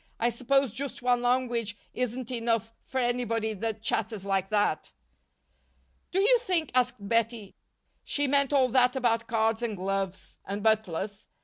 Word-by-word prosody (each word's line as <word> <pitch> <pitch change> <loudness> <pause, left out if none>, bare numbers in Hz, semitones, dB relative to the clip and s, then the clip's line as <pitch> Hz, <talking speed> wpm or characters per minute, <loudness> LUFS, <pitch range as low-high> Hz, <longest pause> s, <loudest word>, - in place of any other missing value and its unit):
"I 235 - +3
suppose 265 +1 +1
just 270 0 -5
one 245 -1 +3
language 245 -4 0 0.2
isn't 250 0 -3
enough 230 -2 -1
for 265 - -7
anybody 240 -3 0
that 220 +1 -4
chatters 220 -3 -1
like 195 -1 0
that." 210 -1 0 1.2
"Do 375 - +1
you 475 +5 +5
think," 360 - 0
asked 250 -5 +1
Bettie, 230 -2 0 0.5
"she 290 - 0
meant 280 0 +2
all 265 -3 +4
that 250 +1 +3
about 230 -3 +1
cards 225 0 +1
and 225 -4 -2
gloves 195 0 -3
and 200 +1 -5
butlers? 205 -2 0
230 Hz, 145 wpm, -28 LUFS, 215-255 Hz, 1.2 s, you